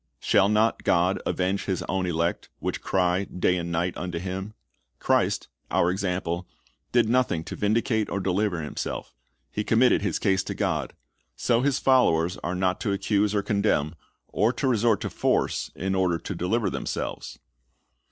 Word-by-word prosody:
"Shall 100 Hz, -, +3 dB
not 110 Hz, +2 st, +2 dB
God 90 Hz, +2 st, +2 dB
avenge 95 Hz, +2 st, 0 dB
His 95 Hz, -3 st, -1 dB
own 95 Hz, -1 st, -1 dB
elect, 85 Hz, 0 st, -1 dB
which -, -, -3 dB
cry 90 Hz, +1 st, +1 dB
day 90 Hz, -1 st, 0 dB
and 85 Hz, -1 st, -3 dB
night 85 Hz, +2 st, -1 dB
unto 90 Hz, -2 st, -4 dB
Him?" 95 Hz, +4 st, -5 dB, 0.4 s
Christ, -, -, +1 dB, 0.2 s
our 85 Hz, -, +2 dB
example, 90 Hz, -2 st, -2 dB, 0.4 s
did 120 Hz, -2 st, +3 dB
nothing 120 Hz, -9 st, +1 dB
to -, -, -7 dB
vindicate 110 Hz, +1 st, +1 dB
or 100 Hz, -, -2 dB
deliver 95 Hz, -2 st, 0 dB
Himself 75 Hz, -, -5 dB, 0.4 s
He 105 Hz, -, -2 dB
committed 115 Hz, +4 st, +4 dB
His 100 Hz, -5 st, 0 dB
case 95 Hz, -1 st, +2 dB
to -, -, -4 dB
God. -, -, -1 dB, 0.4 s
So 120 Hz, -, +1 dB
His 140 Hz, -1 st, +2 dB
followers 90 Hz, -10 st, +3 dB
are 90 Hz, +2 st, -3 dB
not 95 Hz, 0 st, 0 dB
to 100 Hz, -, -1 dB
accuse 105 Hz, +1 st, +1 dB
or 100 Hz, -, +1 dB
condemn, 100 Hz, -8 st, +1 dB, 0.3 s
or 110 Hz, +5 st, +2 dB
to 135 Hz, -, -1 dB
resort 115 Hz, -3 st, +2 dB
to -, -, -2 dB
force -, -, 0 dB
in 95 Hz, +2 st, -2 dB
order 90 Hz, -3 st, +2 dB
to 95 Hz, -, -6 dB
deliver 100 Hz, +6 st, 0 dB
themselves. -, -, -4 dB
95 Hz, 160 wpm, -26 LUFS, 90-105 Hz, 0.4 s, committed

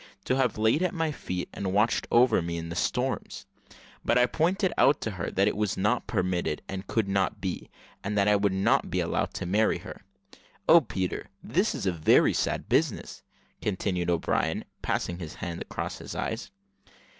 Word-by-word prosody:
to 130 Hz, -, +1 dB
have 130 Hz, -5 st, +1 dB
laid 110 Hz, +8 st, +3 dB
at 185 Hz, +1 st, 0 dB
my 160 Hz, -2 st, 0 dB
feet 90 Hz, -10 st, -4 dB
and 95 Hz, -1 st, -3 dB
watched 105 Hz, +4 st, +2 dB
over 120 Hz, -4 st, +5 dB
me 85 Hz, 0 st, -3 dB
in 85 Hz, 0 st, -5 dB
the 85 Hz, -, -5 dB
storms; 90 Hz, -, -2 dB, 0.6 s
but -, -, +2 dB
I 125 Hz, -, +6 dB
pointed 180 Hz, -, +1 dB
out 140 Hz, -, +4 dB
to 110 Hz, -, -2 dB
her 95 Hz, -4 st, -4 dB
that 95 Hz, +2 st, +2 dB
it -, -, +1 dB
was 105 Hz, -2 st, -1 dB
not 110 Hz, +6 st, +1 dB
permitted, 90 Hz, -4 st, -1 dB
and 95 Hz, 0 st, -6 dB
could 110 Hz, -3 st, 0 dB
not 100 Hz, +2 st, 0 dB
be, 95 Hz, -2 st, -4 dB, 0.3 s
and 105 Hz, +1 st, -2 dB
that 100 Hz, 0 st, +3 dB
I 105 Hz, -, +5 dB
would 100 Hz, -1 st, +2 dB
not 95 Hz, +1 st, +2 dB
be -, -, -1 dB
allowed -, -, 0 dB
to -, -, -3 dB
marry 105 Hz, +5 st, +2 dB
her. -, -, -10 dB, 0.7 s
Oh, 165 Hz, +1 st, +8 dB
Peter! 95 Hz, -, -3 dB
this -, -, +1 dB
is -, -, -4 dB
a 95 Hz, -, +2 dB
very 80 Hz, -3 st, +4 dB
sad -, -, -1 dB
business," -, -, 0 dB, 0.4 s
continued 95 Hz, -3 st, -1 dB
O'Brien, 85 Hz, -2 st, 0 dB, 0.2 s
passing 85 Hz, 0 st, -2 dB
his 80 Hz, -3 st, -7 dB
hand 85 Hz, -2 st, -5 dB
across -, -, -5 dB
his -, -, -7 dB
eyes. -, -, -3 dB
100 Hz, 190 wpm, -28 LUFS, 90-115 Hz, 0.7 s, Oh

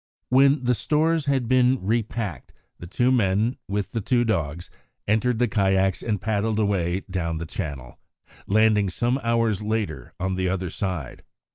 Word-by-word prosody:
When 135 Hz, +2 st, +4 dB
the 125 Hz, 0 st, +2 dB
stores 155 Hz, +6 st, +1 dB
had 135 Hz, -4 st, +1 dB
been 130 Hz, +1 st, +4 dB
repacked, 110 Hz, -, -2 dB, 0.3 s
the 85 Hz, -, -8 dB
two 120 Hz, +7 st, +1 dB
men, 110 Hz, +1 st, +1 dB
with 100 Hz, -1 st, -2 dB
the 115 Hz, -, -2 dB
two 120 Hz, +3 st, +2 dB
dogs, 85 Hz, -7 st, -2 dB, 0.4 s
entered 110 Hz, +3 st, +2 dB
the 120 Hz, +1 st, +2 dB
kayaks 95 Hz, -2 st, +1 dB
and 105 Hz, -3 st, -1 dB
paddled 110 Hz, +1 st, -1 dB
away 95 Hz, -4 st, 0 dB
down 85 Hz, -3 st, -2 dB
the 85 Hz, -, -4 dB
channel, 70 Hz, -8 st, -6 dB, 0.5 s
landing 105 Hz, -1 st, +3 dB
some 120 Hz, +7 st, 0 dB
hours 115 Hz, -3 st, +1 dB
later 110 Hz, 0 st, -3 dB
on 95 Hz, +1 st, -1 dB
the 95 Hz, 0 st, -1 dB
other 90 Hz, -2 st, -2 dB
side. 90 Hz, -10 st, -4 dB
105 Hz, 155 wpm, -24 LUFS, 95-120 Hz, 0.5 s, When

